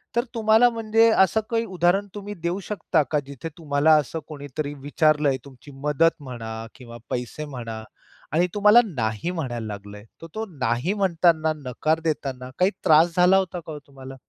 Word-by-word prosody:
तर 235 - +2
तुम्हाला 225 +1 +4
म्हणजे 225 0 +3
असं 220 +1 +3
काही 230 0 0
उदाहरण 185 +1 +1
तुम्ही 205 0 -6
देऊ 175 +3 -1
शकता 190 -5 0
का 150 - +2
जिथे 140 +3 -7
तुम्हाला 150 -1 +2
असं 155 +3 -6
कोणीतरी 145 0 -5
विचारलंय 145 -1 +2
तुमची 140 +1 -14
मदत 150 +2 +2
म्हणा 115 -3 -7
किंवा 120 -3 -11
पैसे 125 +5 -4
म्हणा 115 -6 -7 0.5
आणि 175 +3 +3
तुम्हाला 210 +3 +6
नाही 120 - -3
म्हणायला 125 -10 -4
लागलंय. 105 0 -8 0.2
तर 165 - -8
तो 220 +1 -3
नाही 125 - 0
म्हणताना 170 -5 +2
नकार 155 +6 0
देताना 135 -5 -3
काही 185 +2 +4
त्रास 160 +2 +5
झाला 180 +2 +6
होता 185 -2 -1
का 160 -1 -10
हो 150 - -7
तुम्हाला? 135 -1 -11
155 Hz, 165 wpm, -24 LUFS, 130-190 Hz, 0.5 s, तुम्हाला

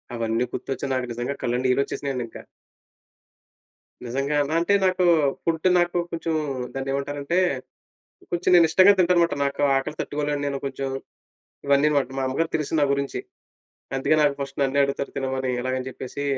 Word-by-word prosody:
అవన్నీ 115 +1 0
గుర్తొచ్చి, 135 - -4
నాకు 130 -1 -1
నిజంగా 120 +4 -3
కళ్ళండి, 125 +1 0
నీళ్ళు 125 +2 +3
వచ్చేసినాయండి 135 -4 -3
ఇంక. - - -11 1.7
నిజంగాన. 140 +4 0
అంటే, 200 +4 +2
నాకు 185 0 +2 0.4
ఫుడ్, 165 -1 0 0.2
నాకు 175 0 +1 0.2
కొంచెం, 165 -1 -2 0.4
దాన్ని 135 0 -3
ఏమంటారంటే, 140 +4 -2 0.9
కొంచెం 175 +1 +1
నేను 170 -1 +7
ఇష్టంగా 185 +4 +7
తింటాను 180 -1 +4
మాట. - - -1
నాకు 140 +1 -2 0.2
ఆకలి 150 +3 -3
తట్టుకోలేను. 145 0 -2
నేను 140 -1 -2
కొంచెం, 135 0 -3 0.8
ఇవన్నీ 140 +2 +4
మాట. 140 - +1
మా - - -1
అమ్మగారికి 160 +5 -1
తెలుసు, 150 -1 -4
నా - - +5
గురించి. 140 0 -2 0.8
అందుకే 155 +3 +2
నాకు, 145 -1 +3
ఫస్ట్ 140 0 -5
నన్నే 140 +1 +2
అడుగుతారు. 140 0 -3
తినమని 130 -1 -1
ఇలాగ 130 0 -1
అని 130 - -5
చెప్పేసి, 130 +2 -6
140 Hz, 155 wpm, -24 LUFS, 130-155 Hz, 1.7 s, నేను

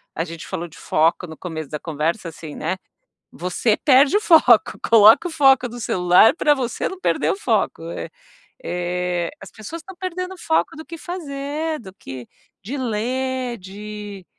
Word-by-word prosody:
A 165 - -1
gente 165 -1 -8
falou 175 +1 -4
de 165 - -16
foco 165 +3 +1
no 160 -1 -10
começo 160 -5 -6
da 150 - -4
conversa, 165 +3 -2
assim, 160 -1 -10
né, 165 +4 -2 0.6
você 185 +5 0
perde 275 +5 +5
o 420 - +3
foco, 310 - +5
coloca 225 +9 +7
o - - -8
foco 270 -5 +4
no 240 +1 -9
celular 180 - +4
para 295 -2 +4
você 250 -4 -2
não 380 - -8
perder - - +1
o - - -3
foco, 415 - 0
é. - - -5 0.6
Eh, 180 -1 -2
as 195 - -10
pessoas 230 +10 -8
estão 380 +2 -12
perdendo 365 0 -4
o - - -16
foco 320 -2 0
do 315 - -8
que 335 - -8
fazer 305 -2 -4
do 190 -4 -11
que 130 - -9 0.4
de 245 +9 -5
ler, 250 +1 -2
de 205 0 -8
225 Hz, 175 wpm, -21 LUFS, 180-290 Hz, 0.6 s, coloca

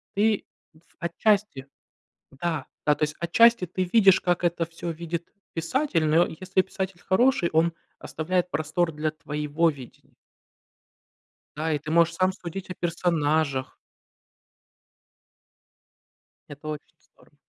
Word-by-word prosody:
ты, 210 +1 +2 0.3
в 160 +2 -26
отчасти 185 -4 0 0.6
да, 155 0 -3 0.2
да, 150 - +5
то - - -8
есть 150 0 -4
отчасти, 230 +4 +5
ты 185 +2 -2
видишь, 195 -5 +6
как 175 0 0
это 170 -1 +1
всё 170 +1 -6
видит 170 +1 -5 0.3
писатель, 170 - 0
но, 160 +3 +5
если 185 +3 0
писатель 190 -1 -5
хороший, 195 -2 +2
он 165 +2 +3 0.3
оставляет 180 +3 -2
простор 165 +2 0
для 155 +1 -1
твоего 150 +1 -1
видения. 135 -5 -13 1.4
Да, 160 +1 -1
и 150 - 0
ты 150 +2 -8
можешь 170 +1 +3
сам 185 +1 +2
судить 185 +1 -7
о - - -3
персонажах. 160 -6 0 2.7
Это 145 +1 -10
очень 155 +1 -7
здорово. - - -27
170 Hz, 125 wpm, -26 LUFS, 155-185 Hz, 2.7 s, видишь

